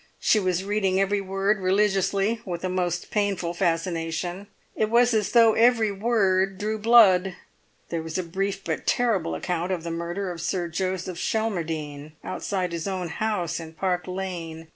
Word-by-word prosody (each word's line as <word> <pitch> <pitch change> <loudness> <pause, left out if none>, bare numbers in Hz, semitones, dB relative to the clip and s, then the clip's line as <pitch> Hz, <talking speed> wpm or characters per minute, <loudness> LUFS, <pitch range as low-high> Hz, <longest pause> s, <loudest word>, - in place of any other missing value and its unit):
She 215 - +3
was 185 -2 0
reading 195 -2 +1
every 200 +1 +1
word 195 +2 0
religiously, 195 +3 +1
with 175 -2 -5
a 185 - -1
most 180 -1 -2
painful 200 -5 0
fascination; 175 +1 -2 0.3
it 215 - 0
was 240 +1 +4
as 215 -2 0
though 230 -2 +6
every 225 -2 +4
word 195 -3 +1
drew 215 +2 -2
blood. 200 -5 +5 0.5
There 170 -1 -2
was 160 +1 -5
a 185 - -1
brief 195 +3 -3
but 160 -2 -4
terrible 210 -9 +1
account 175 0 -2
of 175 -3 -2
the 170 - -4
murder 175 +3 -3
of 170 -2 -7
Sir 175 0 -1
Joseph 185 0 -3
Schelmerdine 160 -9 -3
outside 185 -3 -3
his 170 +2 -4
own 185 -3 -3
house 190 -4 -2
in 160 -1 -9
Park 180 +2 -1
Lane. 170 -4 -5
185 Hz, 165 wpm, -25 LUFS, 170-205 Hz, 0.5 s, though